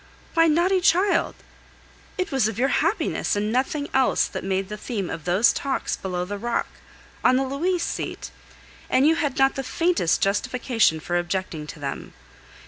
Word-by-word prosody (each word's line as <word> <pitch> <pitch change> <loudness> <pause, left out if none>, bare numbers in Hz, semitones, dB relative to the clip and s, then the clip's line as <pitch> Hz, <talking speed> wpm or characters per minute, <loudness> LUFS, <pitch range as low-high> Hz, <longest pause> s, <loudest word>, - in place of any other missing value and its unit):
Why, 330 0 +5
naughty 355 +4 +3
child, 365 +3 +2 0.8
it 370 - -2
was 265 -6 +2
of 220 - -4
your 265 +3 +2
happiness, 335 - 0
and 210 +1 -1
nothing 275 +4 -1
else, 265 -1 +3
that - - -6
made 190 0 -1
the 210 - -6
theme 210 -3 -4
of 160 -2 -6
those 195 +7 +4
talks 275 -1 -2
below 180 -2 -3
the 205 +2 -5
rock, 240 +2 -1 0.6
on 255 - +5
the 265 - +2
"Louise" 335 +7 -1
seat, - - -4 0.6
and 260 - +3
you 315 - +5
had 290 -4 -1
not 270 0 +4
the 270 - -4
faintest 335 - +1
justification 215 -2 +1
for 175 +2 -1
objecting 175 -3 -3
to 155 - -9
them. 140 -1 -6
250 Hz, 170 wpm, -24 LUFS, 195-305 Hz, 0.8 s, Why